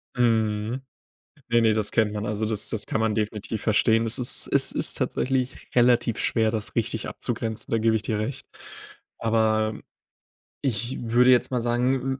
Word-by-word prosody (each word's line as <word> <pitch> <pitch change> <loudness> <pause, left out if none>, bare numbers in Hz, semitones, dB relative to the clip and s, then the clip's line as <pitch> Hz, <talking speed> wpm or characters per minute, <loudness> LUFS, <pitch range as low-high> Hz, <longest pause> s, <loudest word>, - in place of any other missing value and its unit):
Mhm. 110 0 0 0.7
Ne, 120 0 +3
ne, 110 -1 +3
das 105 -1 0
kennt 110 -2 0
man. 105 0 -5
Also, 110 +1 -2
das 105 -1 -2
das 110 -3 -2
kann - - -2
man 110 -1 0
definitiv 105 0 -4
verstehen. 110 +1 +2
Es 115 +4 +2
ist 125 - +7
es - - +5
ist - - +3
tatsächlich 130 -1 -3
relativ 120 -2 +2
schwer, 110 -1 0
das 110 -1 -3
richtig 115 -1 -2
abzugrenzen, 115 -2 -4
da 115 - +1
gebe 110 0 +1
ich 110 - -4
dir 105 +1 -3
recht. 110 +5 -5 0.7
Aber 110 -1 0 0.8
ich 120 -1 -2
würde 120 +2 +3
jetzt 125 - +2
mal 125 -2 -1
sagen 125 +3 -1
115 Hz, 165 wpm, -24 LUFS, 110-120 Hz, 0.8 s, ist